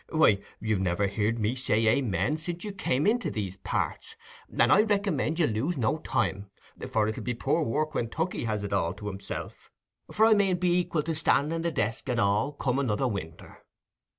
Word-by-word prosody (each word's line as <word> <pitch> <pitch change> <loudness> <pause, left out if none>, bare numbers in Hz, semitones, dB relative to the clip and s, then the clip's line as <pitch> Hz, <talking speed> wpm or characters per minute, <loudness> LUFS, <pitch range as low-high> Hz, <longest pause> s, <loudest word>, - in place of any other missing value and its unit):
Why, 155 -11 +4 0.2
you've 110 -3 0
never 95 +1 +1
heared 105 +3 0
me 110 +1 0
say 115 -4 0
"Amen" 110 - +1
since 175 +2 -5
you 210 - -4
come 145 -7 0
into 235 +3 +2
these 100 -3 -4
parts, - - -3 0.3
and - - +3
I 210 - +6
recommend 200 -7 0
you 170 - +3
to 115 - -1
lose 140 +10 -1
no 130 +6 0
time, 100 -8 -1 0.4
for 110 -1 +1
it'll 110 - -3
be 125 0 -2
poor 150 +7 0
work 155 +3 -1
when 115 - -1
Tookey 160 -1 -2
has 105 -2 -2
it 100 0 -3
all 90 -2 0
to 105 +1 -10
himself, 100 -1 -7 0.4
for 220 - +4
I 225 - +6
mayn't 195 -4 +2
be 180 0 +2
equil 155 -3 -2
to 165 - -1
stand 155 0 +2
i' 165 - -1
the 170 +1 0
desk 115 -3 -2
at 125 - 0
all, 105 +6 +2
come 135 -2 -1
another 130 -1 0
winter." 95 -8 -7
125 Hz, 205 wpm, -28 LUFS, 105-165 Hz, 0.4 s, I